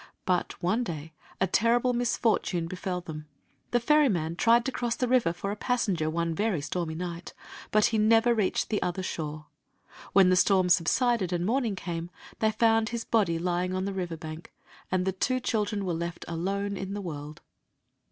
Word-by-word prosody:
But 180 Hz, -1 st, 0 dB
one 215 Hz, +8 st, +1 dB
day 160 Hz, -5 st, -6 dB, 0.3 s
a 190 Hz, -, +3 dB
terrible 235 Hz, +6 st, +2 dB
misfortune 225 Hz, -7 st, 0 dB
befell 180 Hz, +1 st, -4 dB
them. 155 Hz, -3 st, -8 dB, 0.4 s
The 245 Hz, -, +2 dB
ferryman 235 Hz, -, +2 dB
tried 230 Hz, +5 st, +4 dB
to 265 Hz, -, -1 dB
cross 240 Hz, -2 st, -1 dB
the 250 Hz, -, -1 dB
river 245 Hz, -8 st, +3 dB
for 185 Hz, +3 st, -4 dB
a -, -, -3 dB
passenger 205 Hz, -9 st, 0 dB
one 165 Hz, +1 st, -1 dB
very 205 Hz, 0 st, 0 dB
stormy 160 Hz, +3 st, -3 dB
night; 170 Hz, 0 st, -6 dB, 0.3 s
but 215 Hz, 0 st, +4 dB
he 220 Hz, -, +2 dB
never 225 Hz, +2 st, +4 dB
reached 215 Hz, -2 st, 0 dB
the 210 Hz, -, 0 dB
other 180 Hz, +1 st, -2 dB
shore. 155 Hz, -3 st, -5 dB, 0.7 s
When 190 Hz, -1 st, +6 dB
the -, -, +5 dB
storm 185 Hz, 0 st, +3 dB
subsided 190 Hz, +4 st, +2 dB
and 175 Hz, 0 st, -1 dB
morning 230 Hz, -1 st, 0 dB
came 170 Hz, -2 st, -5 dB, 0.3 s
they 220 Hz, -, +3 dB
found 225 Hz, 0 st, +3 dB
his 235 Hz, -1 st, -4 dB
body 200 Hz, -8 st, +2 dB
lying 180 Hz, +2 st, -1 dB
on 185 Hz, 0 st, -1 dB
the 200 Hz, -, -3 dB
river 175 Hz, -3 st, -3 dB
bank, 155 Hz, +1 st, -8 dB, 0.4 s
and 185 Hz, 0 st, +1 dB
the 190 Hz, -, +1 dB
two 255 Hz, +7 st, 0 dB
children 210 Hz, -4 st, -1 dB
were 180 Hz, -, -1 dB
left 170 Hz, +1 st, -4 dB
alone 195 Hz, +4 st, -2 dB
in 195 Hz, +1 st, -4 dB
the 205 Hz, -, -4 dB
world. 150 Hz, -4 st, -7 dB
185 Hz, 180 wpm, -28 LUFS, 170-225 Hz, 0.7 s, When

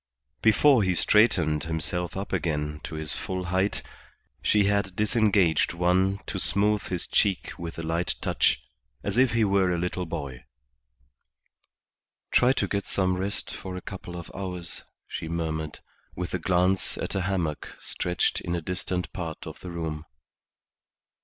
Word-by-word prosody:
Before 120 Hz, +3 st, +6 dB
he 95 Hz, -2 st, +2 dB
straightened 85 Hz, -9 st, +4 dB
himself 85 Hz, +2 st, -2 dB
up 100 Hz, +1 st, -4 dB
again 75 Hz, -4 st, -1 dB
to 80 Hz, -, -6 dB
his 80 Hz, -1 st, -2 dB
full 95 Hz, -1 st, -3 dB
height 95 Hz, +2 st, +1 dB, 0.6 s
she 105 Hz, -1 st, +4 dB
had 100 Hz, -2 st, +1 dB
disengaged 100 Hz, -7 st, +3 dB
one 90 Hz, +3 st, +3 dB
to -, -, -3 dB
smooth 105 Hz, +1 st, +4 dB
his 90 Hz, -2 st, -2 dB
cheek 100 Hz, -4 st, +1 dB
with 85 Hz, -1 st, -6 dB
a 85 Hz, -, -4 dB
light 85 Hz, +2 st, 0 dB
touch, -, -, +2 dB, 0.4 s
as 100 Hz, +4 st, 0 dB
if 130 Hz, -3 st, +4 dB
he 115 Hz, -1 st, +3 dB
were 95 Hz, -2 st, +3 dB
a 90 Hz, -, +1 dB
little 90 Hz, 0 st, -2 dB
boy. 70 Hz, -7 st, -5 dB, 1.9 s
"Try 125 Hz, +1 st, +5 dB
to 135 Hz, -, +1 dB
get 100 Hz, -1 st, -2 dB
some 95 Hz, -1 st, +1 dB
rest 95 Hz, +2 st, -2 dB
for 95 Hz, -1 st, -6 dB
a 90 Hz, -, -5 dB
couple 90 Hz, -3 st, -7 dB
of 85 Hz, -, -8 dB
hours," 90 Hz, -3 st, -5 dB, 0.3 s
she 80 Hz, -, -5 dB
murmured, 80 Hz, -2 st, -3 dB, 0.3 s
with 90 Hz, 0 st, -4 dB
a 90 Hz, -, 0 dB
glance 90 Hz, +2 st, +2 dB
at -, -, -3 dB
a 95 Hz, -, 0 dB
hammock 90 Hz, -5 st, -2 dB
stretched 90 Hz, 0 st, 0 dB
in 85 Hz, -, -2 dB
a -, -, 0 dB
distant 90 Hz, +1 st, -2 dB
part 80 Hz, -3 st, -5 dB
of -, -, -8 dB
the 90 Hz, -, -8 dB
room. 80 Hz, -2 st, -4 dB
90 Hz, 155 wpm, -27 LUFS, 85-100 Hz, 1.9 s, Before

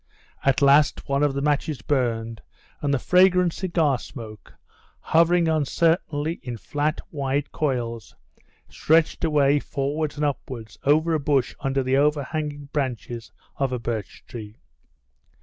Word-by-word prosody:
At 135 Hz, +1 st, +2 dB
last 140 Hz, +1 st, +4 dB
one 140 Hz, 0 st, +1 dB
of 145 Hz, -2 st, +2 dB
the 140 Hz, -, -1 dB
matches 150 Hz, 0 st, 0 dB
burned, 115 Hz, -5 st, -1 dB, 0.4 s
and 145 Hz, -, 0 dB
the 140 Hz, -, +3 dB
fragrant 180 Hz, +3 st, +4 dB
cigar 165 Hz, -8 st, 0 dB
smoke, 110 Hz, -5 st, -10 dB, 0.4 s
hovering 170 Hz, +1 st, +3 dB
uncertainly 160 Hz, 0 st, 0 dB
in 120 Hz, -2 st, -6 dB
flat, 150 Hz, +6 st, -2 dB
wide 140 Hz, -1 st, -2 dB
coils, 120 Hz, -8 st, -3 dB, 0.5 s
stretched 160 Hz, +2 st, +1 dB
away 145 Hz, -3 st, +3 dB
forwards 145 Hz, +2 st, -2 dB
and 150 Hz, 0 st, -1 dB
upwards 115 Hz, -6 st, -5 dB
over 155 Hz, +4 st, +3 dB
a 155 Hz, -, +2 dB
bush 140 Hz, -3 st, +1 dB
under 135 Hz, -1 st, 0 dB
the 130 Hz, +1 st, +1 dB
overhanging 145 Hz, 0 st, -1 dB
branches 120 Hz, -4 st, -3 dB, 0.3 s
of 135 Hz, -2 st, 0 dB
a 125 Hz, -, -1 dB
birch 115 Hz, -4 st, -5 dB
tree. 110 Hz, -2 st, -9 dB
140 Hz, 130 wpm, -24 LUFS, 125-155 Hz, 0.5 s, last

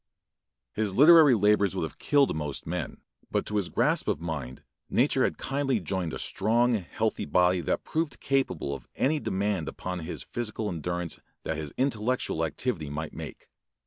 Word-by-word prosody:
His 105 Hz, -3 st, -1 dB
literary 150 Hz, -1 st, +8 dB
labors 105 Hz, -2 st, +3 dB
would 90 Hz, -, -1 dB
have 80 Hz, -, -6 dB
killed 145 Hz, -, +3 dB
most 75 Hz, -2 st, -4 dB
men, -, -, -4 dB, 0.3 s
but -, -, 0 dB
to 105 Hz, -, -2 dB
his 95 Hz, -4 st, 0 dB
grasp -, -, +1 dB
of -, -, 0 dB
mind 75 Hz, -7 st, -5 dB, 0.3 s
nature -, -, +3 dB
had -, -, 0 dB
kindly 135 Hz, -3 st, 0 dB
joined 90 Hz, -1 st, -2 dB
a -, -, -4 dB
strong, 115 Hz, +5 st, +1 dB
healthy 110 Hz, +2 st, -1 dB
body 90 Hz, +4 st, +3 dB
that 75 Hz, -, -1 dB
proved 160 Hz, -5 st, -2 dB
capable 90 Hz, -, 0 dB
of 70 Hz, -, -8 dB
any 150 Hz, +3 st, +1 dB
demand 95 Hz, -, -1 dB
upon 90 Hz, +2 st, -4 dB
his 85 Hz, +1 st, -5 dB
physical 110 Hz, -2 st, -3 dB
endurance 85 Hz, 0 st, -3 dB, 0.2 s
that 80 Hz, -, -2 dB
his 75 Hz, -2 st, -5 dB
intellectual 125 Hz, -, 0 dB
activity 80 Hz, -, -2 dB
might 75 Hz, +2 st, -5 dB
make. -, -, -8 dB
100 Hz, 165 wpm, -28 LUFS, 80-120 Hz, 0.3 s, literary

